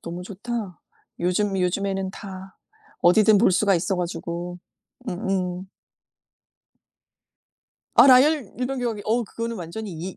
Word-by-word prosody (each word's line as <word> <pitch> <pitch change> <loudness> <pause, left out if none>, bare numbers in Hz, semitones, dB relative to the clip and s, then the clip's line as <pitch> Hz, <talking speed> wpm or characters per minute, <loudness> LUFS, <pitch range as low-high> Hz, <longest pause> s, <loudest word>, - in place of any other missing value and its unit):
너무 170 +1 -7
좋다. 205 -2 -6 0.4
요즘 195 +3 0
요즘에는 190 +1 -1
다 190 -1 -10 0.4
어디든 210 +4 +5
볼 220 - +4
수가 195 +2 +3
있어 180 +3 0
가지고. 175 0 -4 0.5
음음. 185 -1 -2 2.3
아 - - +8
라이언 265 -2 +5
일병 255 +1 -2
구하기. 230 -4 -3
어 230 +2 +1
그거는 230 +2 -5
완전히 190 +5 -6
이 175 +4 -7
195 Hz, 240 characters per minute, -24 LUFS, 180-220 Hz, 2.3 s, 아